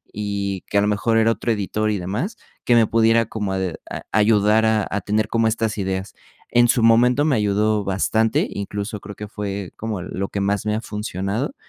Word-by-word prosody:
y 100 Hz, -2 st, -3 dB
que, 100 Hz, -, +1 dB
a -, -, +3 dB
lo 105 Hz, -, +1 dB
mejor, 110 Hz, +2 st, +1 dB
era 115 Hz, 0 st, +4 dB
otro 115 Hz, -, -1 dB
editor 110 Hz, 0 st, -1 dB
y 105 Hz, -, 0 dB
demás, 105 Hz, -, -3 dB, 0.3 s
que 120 Hz, -, +4 dB
me 115 Hz, -1 st, +5 dB
pudiera 115 Hz, 0 st, +3 dB
como 105 Hz, -4 st, -3 dB
a -, -, -1 dB, 0.3 s
a -, -, -5 dB
ayudar 105 Hz, +1 st, +3 dB
a 110 Hz, -2 st, +2 dB
a 100 Hz, -, -1 dB
tener 105 Hz, +2 st, 0 dB
como 115 Hz, -1 st, +2 dB
estas 110 Hz, 0 st, -1 dB
ideas, 95 Hz, 0 st, -3 dB, 0.4 s
en 120 Hz, 0 st, +5 dB
su 120 Hz, -1 st, +3 dB
momento 125 Hz, +5 st, +4 dB
me 150 Hz, -4 st, +2 dB
ayudó 105 Hz, 0 st, +1 dB
bastante, 110 Hz, +3 st, +1 dB
incluso 100 Hz, +1 st, -4 dB
creo 105 Hz, 0 st, -9 dB
que 105 Hz, -, -7 dB
fue 100 Hz, -2 st, -5 dB
como 110 Hz, -4 st, -4 dB
lo 95 Hz, +1 st, -4 dB
que 100 Hz, -, -3 dB
más 100 Hz, 0 st, 0 dB
me 105 Hz, -, +1 dB
ha 110 Hz, -, -2 dB
funcionado, 105 Hz, -, -3 dB
105 Hz, 205 wpm, -21 LUFS, 100-115 Hz, 0.4 s, me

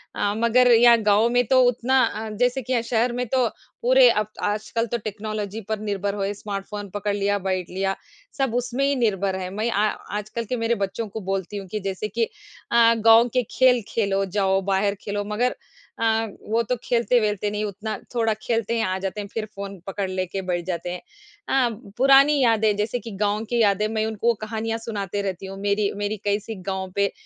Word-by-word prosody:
अ, 205 Hz, -, 0 dB
मगर 240 Hz, +2 st, +4 dB
यहाँ 235 Hz, 0 st, +7 dB
गाँव 210 Hz, +2 st, +4 dB
में 245 Hz, 0 st, +2 dB
तो 260 Hz, -1 st, +5 dB
उतना 250 Hz, +2 st, +3 dB
अ, 220 Hz, +1 st, -4 dB
जैसे 245 Hz, +5 st, 0 dB
कि 255 Hz, +2 st, -3 dB
यहाँ 235 Hz, -, +2 dB
शहर 235 Hz, +1 st, +1 dB
में 250 Hz, +1 st, -2 dB
तो 250 Hz, +1 st, +2 dB, 0.3 s
पूरे -, -, +6 dB
अब 210 Hz, -1 st, +1 dB, 0.2 s
आजकल 220 Hz, +2 st, -1 dB
तो 240 Hz, -, -1 dB
टेक्नोलॉजी 215 Hz, 0 st, -4 dB
पर 220 Hz, -, -1 dB
निर्भर 200 Hz, -1 st, -2 dB
हुए 200 Hz, 0 st, -1 dB
स्मार्टफ़ोन 205 Hz, 0 st, -6 dB
पकड़ 205 Hz, 0 st, -1 dB
लिया, 205 Hz, 0 st, +1 dB
बैठ 185 Hz, -2 st, -2 dB
लिया 195 Hz, +1 st, -1 dB, 0.4 s
सब 270 Hz, -4 st, 0 dB
उसमें 245 Hz, +2 st, -1 dB
ही 280 Hz, 0 st, +2 dB
निर्भर 200 Hz, -5 st, 0 dB
है। 185 Hz, -1 st, -4 dB
मैं 215 Hz, +4 st, -1 dB
आ 210 Hz, +2 st, +2 dB, 0.3 s
आजकल 215 Hz, +2 st, -4 dB
के 250 Hz, -, -2 dB
मेरे 230 Hz, +1 st, +1 dB
बच्चों 200 Hz, +2 st, -3 dB
को 215 Hz, +2 st, -7 dB
बोलती 195 Hz, +1 st, -3 dB
हूँ 195 Hz, -, -7 dB
कि, 215 Hz, +3 st, -4 dB
जैसे 195 Hz, +1 st, -3 dB
कि 230 Hz, +3 st, -1 dB, 0.5 s
अ, 230 Hz, -1 st, +6 dB
"गाँव 225 Hz, +1 st, +7 dB
के 250 Hz, -, +2 dB
खेल 255 Hz, -2 st, +4 dB
खेलो, 200 Hz, -3 st, 0 dB
जाओ 195 Hz, 0 st, +1 dB
बाहर 200 Hz, +1 st, +1 dB
खेलो" 205 Hz, 0 st, -3 dB
मगर 245 Hz, +3 st, +1 dB, 0.4 s
अ, -, -, -1 dB, 0.5 s
वो 230 Hz, +1 st, +2 dB
तो 250 Hz, +2 st, -1 dB
खेलते-वेलते 220 Hz, -4 st, +1 dB
नहीं 210 Hz, 0 st, -2 dB
उतना 215 Hz, +2 st, -4 dB, 0.2 s
थोड़ा 225 Hz, -2 st, +2 dB
खेलते 230 Hz, 0 st, -1 dB
हैं, 225 Hz, -, +1 dB
आ 185 Hz, 0 st, -1 dB
जाते 195 Hz, +2 st, -3 dB
हैं 200 Hz, -, -7 dB
फिर 220 Hz, -1 st, -2 dB
फ़ोन 200 Hz, 0 st, -6 dB
पकड़ 195 Hz, 0 st, -3 dB
ले 185 Hz, 0 st, -1 dB
के 190 Hz, +2 st, -4 dB
बैठ 175 Hz, -2 st, -2 dB
जाते 175 Hz, -1 st, -3 dB
हैं। 180 Hz, -, -6 dB, 0.5 s
अ, 260 Hz, -3 st, +3 dB, 0.3 s
पुरानी 275 Hz, +3 st, +6 dB
यादें 220 Hz, -3 st, +3 dB
जैसे 215 Hz, +4 st, -1 dB
कि 230 Hz, -1 st, -9 dB
गाँव 210 Hz, +1 st, +1 dB
की 240 Hz, -1 st, +2 dB
यादें 210 Hz, 0 st, +3 dB
मैं 220 Hz, 0 st, -1 dB
उनको 220 Hz, +2 st, +1 dB
कहानियाँ 225 Hz, +1 st, -2 dB
सुनाते 200 Hz, -3 st, -3 dB
रहती 190 Hz, -1 st, -4 dB
हूँ, 195 Hz, 0 st, -7 dB
मेरी, 200 Hz, 0 st, +1 dB
मेरी 205 Hz, +1 st, -2 dB
कैसी 205 Hz, +2 st, -1 dB, 0.2 s
गाँव 190 Hz, -1 st, -4 dB
पे 200 Hz, 0 st, +2 dB
215 Hz, 205 wpm, -23 LUFS, 200-235 Hz, 0.5 s, यहाँ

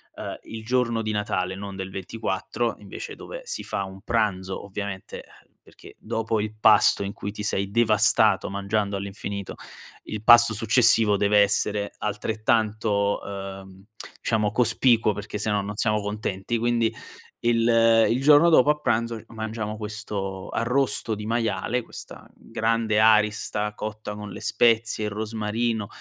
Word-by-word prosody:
ehm, -, -, -6 dB
il 110 Hz, 0 st, -9 dB
giorno 120 Hz, -1 st, +1 dB
di 110 Hz, -1 st, -2 dB
Natale, 95 Hz, -3 st, -2 dB
non 100 Hz, 0 st, -7 dB
del 95 Hz, 0 st, -5 dB
24 110 Hz, +4 st, -3 dB
invece 100 Hz, -2 st, -8 dB
dove -, -, -9 dB
si 485 Hz, 0 st, -5 dB
fa 100 Hz, -, -3 dB
un 95 Hz, 0 st, -11 dB
pranzo 100 Hz, -5 st, -1 dB
ovviamente, 100 Hz, -1 st, -6 dB, 0.2 s
uhm, -, -, -41 dB
perché -, -, -16 dB
dopo 110 Hz, 0 st, -2 dB
il 105 Hz, 0 st, -4 dB
pasto 110 Hz, -, +5 dB
in 100 Hz, 0 st, -4 dB
cui 100 Hz, -1 st, -6 dB
ti 105 Hz, -, -8 dB
sei 100 Hz, -1 st, -2 dB
devastato 110 Hz, -1 st, +3 dB
mangiando 100 Hz, 0 st, -1 dB
all'infinito, 100 Hz, 0 st, -6 dB, 0.5 s
il 105 Hz, -, -6 dB
pasto 120 Hz, 0 st, +7 dB
successivo 115 Hz, -1 st, +4 dB
deve 105 Hz, +1 st, +3 dB
essere 100 Hz, 0 st, +1 dB
altrettanto, 110 Hz, -1 st, 0 dB
ehm, 95 Hz, -1 st, -8 dB, 0.4 s
diciamo 105 Hz, -2 st, 0 dB
cospicuo 115 Hz, -1 st, +3 dB
perché 105 Hz, +1 st, -6 dB
se 110 Hz, -, -2 dB
no 105 Hz, -1 st, +1 dB
non 100 Hz, +1 st, -6 dB
siamo 105 Hz, -1 st, +1 dB
contenti, 105 Hz, +1 st, -3 dB
quindi 115 Hz, -1 st, +1 dB, 0.5 s
il 115 Hz, -1 st, +4 dB
il 125 Hz, +3 st, 0 dB
giorno 150 Hz, +3 st, +7 dB
dopo 150 Hz, -3 st, +5 dB
a 150 Hz, -, -3 dB
pranzo 115 Hz, -4 st, -1 dB
mangiamo 110 Hz, -1 st, -5 dB
questo 105 Hz, -3 st, -5 dB
arrosto 120 Hz, -1 st, 0 dB
di 105 Hz, 0 st, -5 dB
maiale, 115 Hz, +1 st, -1 dB
questa -, -, -11 dB
grande 110 Hz, -1 st, -1 dB
arista 105 Hz, -1 st, +2 dB
cotta 105 Hz, -1 st, -6 dB
con 105 Hz, -1 st, -8 dB
le -, -, -9 dB
spezie, 110 Hz, -1 st, +2 dB
il 105 Hz, -, -3 dB
rosmarino, 110 Hz, +1 st, -2 dB
110 Hz, 145 wpm, -24 LUFS, 100-115 Hz, 0.5 s, pasto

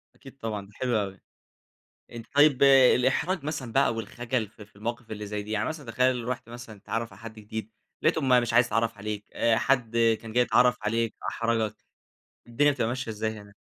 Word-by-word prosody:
أكيد 135 Hz, 0 st, -15 dB
طبعًا 105 Hz, -3 st, -4 dB
ده 100 Hz, -, -19 dB
حلو 125 Hz, -2 st, 0 dB
أوي. 95 Hz, -2 st, -6 dB, 0.9 s
أنت 115 Hz, -1 st, -8 dB
طيّب 145 Hz, -2 st, +5 dB
الإحراج 135 Hz, +5 st, +4 dB
مثلًا 145 Hz, -6 st, -4 dB
بقى 135 Hz, -3 st, +3 dB
والخجل 115 Hz, +1 st, -3 dB
في 105 Hz, 0 st, -14 dB
في 105 Hz, -, -30 dB
المواقف 115 Hz, +2 st, -5 dB
اللي 105 Hz, -1 st, -5 dB
زي 105 Hz, 0 st, -4 dB
دي. 105 Hz, -, -8 dB
يعني 105 Hz, -1 st, 0 dB
مثلًا 150 Hz, -7 st, -7 dB
تخيّل 125 Hz, 0 st, +1 dB
رُحت 125 Hz, -2 st, -4 dB
مثلًا 115 Hz, -3 st, -10 dB
تتعرف 115 Hz, +3 st, -4 dB
على -, -, -16 dB
حد 115 Hz, -1 st, -8 dB
جديد، 110 Hz, 0 st, -7 dB, 0.3 s
لقيته 160 Hz, -, +2 dB
ما 130 Hz, -3 st, +5 dB
مش 120 Hz, -1 st, -2 dB
عايز 120 Hz, +1 st, +6 dB
يتعرف 115 Hz, 0 st, -1 dB
عليك، 105 Hz, 0 st, -5 dB, 0.3 s
حد 120 Hz, -2 st, +1 dB, 0.2 s
كان 115 Hz, -1 st, -9 dB
جاي 125 Hz, +1 st, +4 dB
يتعرف 125 Hz, 0 st, +3 dB
عليك، 115 Hz, +1 st, -1 dB
أحرجك. 115 Hz, -2 st, -1 dB, 0.7 s
الدنيا 145 Hz, +5 st, +3 dB
بتبقى 125 Hz, -5 st, -1 dB
ماشية 125 Hz, -1 st, -3 dB
إزاي 110 Hz, +1 st, -2 dB
هنا؟ 100 Hz, 0 st, -15 dB
115 Hz, 190 wpm, -27 LUFS, 110-125 Hz, 0.9 s, عايز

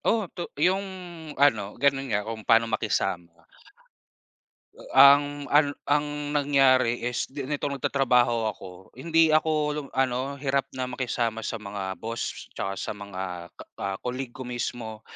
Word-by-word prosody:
Oo, 225 Hz, -2 st, +2 dB
to 175 Hz, -, -5 dB
yung 185 Hz, +6 st, +3 dB, 0.6 s
ano 110 Hz, -8 st, +2 dB
ganon 135 Hz, -1 st, +1 dB
nga 105 Hz, -2 st, 0 dB
kung 110 Hz, 0 st, -5 dB
paano 115 Hz, +2 st, +4 dB
makisama. 85 Hz, -6 st, -2 dB, 1.3 s
Eh, -, -, -15 dB
ang 145 Hz, +1 st, +6 dB
ano 145 Hz, -1 st, +4 dB
ang 145 Hz, 0 st, -1 dB
nangyari 135 Hz, -4 st, +3 dB
is 125 Hz, 0 st, -1 dB
ni 140 Hz, -1 st, -4 dB
nitong 145 Hz, 0 st, -2 dB
nagtatrabaho 125 Hz, -4 st, +2 dB
ako, 95 Hz, -1 st, -13 dB
hindi 165 Hz, +5 st, +3 dB
ako 155 Hz, +1 st, +3 dB, 0.2 s
long 150 Hz, -2 st, -5 dB
ano 135 Hz, +1 st, 0 dB
hirap 140 Hz, 0 st, 0 dB
na 130 Hz, -, -1 dB
makisama 120 Hz, -3 st, -2 dB
sa 115 Hz, -, -3 dB
mga 100 Hz, -2 st, -5 dB
boss, 115 Hz, +1 st, -5 dB
tsaka 95 Hz, 0 st, -3 dB
sa -, -, -3 dB
mga 95 Hz, -4 st, -6 dB
ka -, -, -12 dB
ka-colleague 125 Hz, +6 st, -4 dB
ko 130 Hz, +1 st, -8 dB
mismo. 120 Hz, -3 st, -4 dB
125 Hz, 140 wpm, -26 LUFS, 110-140 Hz, 1.3 s, ang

